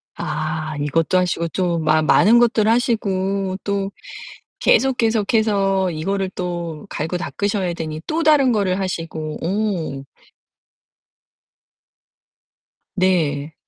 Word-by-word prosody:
아. 155 0 -3
이것도 165 +5 +1
하시고 170 -2 -1
또 175 -2 -1
마 155 0 +2
많은 220 +9 +5
것들 230 -3 +3
하시고 195 -5 0
또 200 -1 -2 0.7
계속 265 -1 +3
계속해서 205 -4 +1
이거를 190 +4 -2
또 170 -3 -4
갈고 160 +4 -3
닦으셔야 190 0 -2
되니 155 -2 -5
또 325 +1 -1
다른 290 -5 +4
거를 195 -3 0
하시고 165 -4 -4
오. 180 -8 -2 2.9
네. 160 -5 +1
185 Hz, 195 characters per minute, -20 LUFS, 160-205 Hz, 2.9 s, 많은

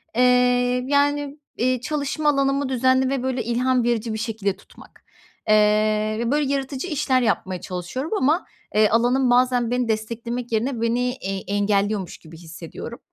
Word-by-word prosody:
Eee, 250 0 +3
yani, 290 0 +1 0.2
iii, 255 0 +1
çalışma 300 +1 -1
alanımı 275 -1 +1
düzenli 260 +1 +2
ve, 270 -2 -2
böyle, 260 -2 -1
ilham 245 +2 +1
verici 230 -1 -1
bir - - -3
şekilde 215 -3 -2
tutmak. - - -18 0.5
Eee, 215 0 +3
ve, 235 +1 -1
böyle, 285 -1 +1
yaratıcı 270 +3 -3
işler 275 -5 +1
yapmaya 185 -5 -1
çalışıyorum 185 - -5
ama, 310 +3 +1 0.3
eee, 215 0 +5
alanım 245 +3 +2
bazen 245 -1 +2
beni 250 -1 0
desteklemek 230 +2 -3
yerine 230 +2 -1
beni, 240 +2 +1
eee, 195 -5 -5
engelliyormuş 205 -1 0
gibi 160 0 -14
hissediyorum. 165 0 -9
245 Hz, 145 wpm, -22 LUFS, 215-265 Hz, 0.5 s, eee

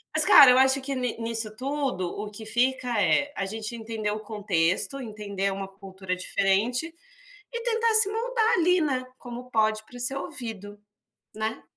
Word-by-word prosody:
Mas, - - +4
cara 275 -4 +9
eu 250 - +5
acho 265 +1 +4
que 275 +1 -4
ni 250 -3 -2
nisso 225 -2 -3
tudo, 270 -8 -2
o 205 +4 -5
que 220 +1 -10
fica 245 -1 0
é: 285 +9 +2
a 195 - -2
gente 220 +3 -5
entender 220 -2 -3
o 210 - -3
contexto, 205 +3 -1
entender 200 -3 -3
uma 195 0 -5
cultura 190 -1 -6
diferente, 210 - 0 0.6
e 470 - -4
tentar 460 -1 +1
se 430 -2 +5
moldar 455 0 +1
ali, 360 0 +3
né, 260 -4 0
como 245 0 -8
pode, 215 0 +1
pra 245 +2 -12
ser 265 +3 -2
ouvido, 210 -6 -7 0.6
né. 220 +1 -3
230 Hz, 170 wpm, -26 LUFS, 205-270 Hz, 0.6 s, cara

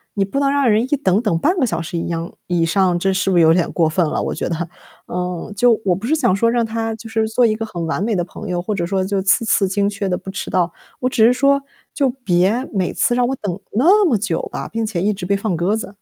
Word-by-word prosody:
你 195 - +1
不 200 +8 -5
能 275 -1 +2
让 280 -3 +2
人 215 +2 +3
一 - - -3
等 205 -5 +1
等 205 -8 0
半 350 - +1
个 260 - +3
小 190 -7 -2
时 170 +1 -5
一 165 - -3
样 165 0 -4
以 175 -2 +1
上， 180 0 +2
这 195 +1 +1
是 190 +1 0
不 175 - +2
是 - - +6
有 160 0 +6
点 175 -1 +1
过 165 -2 +2
分 165 +2 +1
了， - - -1
我 - - -2
觉 - - -3
得？ 170 0 -3 0.4
嗯， 180 +2 -4
就 235 +1 +3
我 180 -2 +3
不 195 +6 -7
是 290 - +1
想 240 -11 +2
说 230 +4 +2
让 235 -1 +1
他 225 0 -3
就 225 +1 -11
是 225 0 0
做 240 +2 +3
一 215 -2 +2
个 225 0 -4
很 175 -6 -5
完 175 +4 -1
美 230 - 0
的 175 - 0
朋 210 +4 -9
友， 175 -1 -1
或 210 +3 -3
者 175 -3 -1
说 190 +1 0
就 195 -1 -1
次 215 +5 +2
次 200 -2 +2
精 200 +1 0
确 200 -1 -3
地 180 - 0
不 - - -10
迟 190 - -5
到。 175 -2 +1 0.3
我 255 - 0
只 225 -4 +3
是 240 - +6
说， 280 +2 +3 0.3
就 275 -3 +1
别 225 0 +1
每 190 -3 0
次 240 - +1
让 245 - +2
我 270 - -1
等 185 -4 -4
那 360 - +4
么 255 -10 +3
久 195 -5 -2
吧， - - -5
并 225 0 -3
且 205 -6 -3
一 210 +3 +1
直 195 -2 -6
被 200 +2 +1
放 200 -3 -2
鸽 180 +6 +1
子。 205 -2 -7
200 Hz, 310 characters per minute, -19 LUFS, 180-230 Hz, 0.4 s, 是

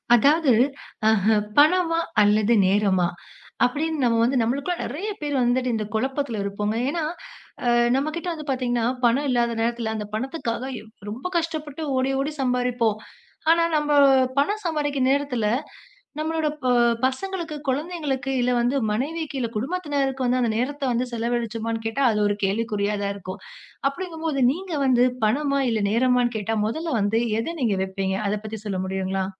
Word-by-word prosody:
அதாவது 290 +4 +4 0.6
அஹ 220 0 +3 0.2
பணமா 330 +2 +4 0.2
அல்லது 210 +2 +3
நேரமா 190 -2 +2 0.6
அப்பிடின்னு 300 +3 -1
நம்ம 235 -2 +3
வந்து 255 +3 +2
நம்மளுக்குள்ள 275 +9 -1
நிறைய 325 - -4
பேர் 290 -1 -2
வந்துட்டு 250 +1 +1
இந்தக் 215 -2 -3
குழப்பத்துல 265 -1 -1
இருப்போங்க. 205 +2 -2
ஏன்னா 330 +2 -2 0.6
அ - - +3 0.3
நம்மகிட்ட 310 +6 -2
வந்து 310 -2 -8
பாத்தீங்கன்னா, 245 -3 0 0.2
பணம் 265 +5 +2
இல்லாத 240 -2 +1
நேரத்துல 230 -1 -1
அந்தப் 210 -1 -6
பணத்துக்காக 240 0 -3 0.2
எவ் 220 - -14 0.2
ரொம்ப 240 +11 -5
கஷ்டப்பட்டு 315 -2 -3 0.2
ஓடி 260 +1 +1
ஓடி 280 +3 -1
சம்பாரிப்போம். 245 -4 +1 0.5
ஆனா 335 0 +4
நம்ம 300 0 -1 0.5
பணம் 415 +9 0
சம்பாதிக்கிற 290 -5 0
நேரத்துல 275 -5 0 0.7
நம்மளோட 315 0 -1 0.2
ப 255 - +2 0.4
பசங்களுக்கு, 335 +4 -3
குழந்தைங்களுக்கு 285 -2 -2
இல்ல 245 +1 +2
வந்து 245 +3 +1 0.2
மனைவிக்கு 290 +6 -2
இல்ல 235 -2 -1
குடும்பத்தினருக்கு 275 -2 -1
வந்து 250 +1 +2
அந்த 235 -2 +1
நேரத்த 280 +4 -2
வந்து 240 +1 0
செலவழிச்சமான்னு 230 -1 -2
கேட்டா 225 +5 -2
அது 210 - 0
ஒரு 205 - 0
கேள்விக்குறியாதான் 205 -1 -1
இருக்கும். 190 0 -7 0.5
அப்பிடிங்கம்போது, 320 -3 -3
நீங்க 360 +4 -5
வந்து 250 -2 +4 0.2
பணமா 280 +5 +1
இல்ல 220 -2 0
நேரமான்னு 245 +1 +2
கேட்டா 220 +1 -2
முதல்ல 315 +4 -2
வந்து 205 +3 +2 0.2
எதை 330 +9 -3
நீங்க 210 -5 +1
வெப்பீங்க? 190 0 -2
அதப் 210 0 -2
பத்தி 220 0 -5
சொல்ல 195 -3 -2
முடியுங்களா? 190 0 -2
250 Hz, 145 wpm, -24 LUFS, 220-295 Hz, 0.7 s, அதாவது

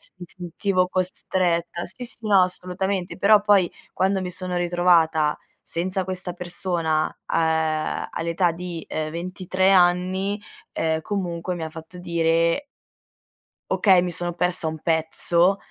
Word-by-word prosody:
mi 180 -1 -9
sentivo 180 +2 -1
costretta. 180 -2 -1
Sì, 250 - -6
sì, 235 -1 -4
no, 200 -2 +6
assolutamente, 180 +1 -2
però, 205 +2 +5
poi, 205 -4 +4 0.2
quando 190 +1 +1
mi 180 -1 -4
sono 180 0 -3
ritrovata 170 -3 +3 0.3
senza 185 +3 -2
questa 180 -1 -4
persona 170 -3 -1 0.2
a 160 -1 0
uhm, - - -6
all'età, 170 +2 +1
uhm, 165 - -4
di 175 -2 -6
23 185 +4 -1
anni, 185 +2 +2 0.3
ehm, 160 -1 0
comunque, 180 -2 -3
mi 170 - -5
ha 160 - -4
fatto 160 +2 -11
dire 170 - +1 1.0
"Okay, 190 -4 +5
mi 175 0 -2
sono 175 0 -3
persa 175 -1 -1
un 160 0 -4
pezzo". 170 +3 +2
180 Hz, 135 wpm, -23 LUFS, 165-185 Hz, 1.0 s, no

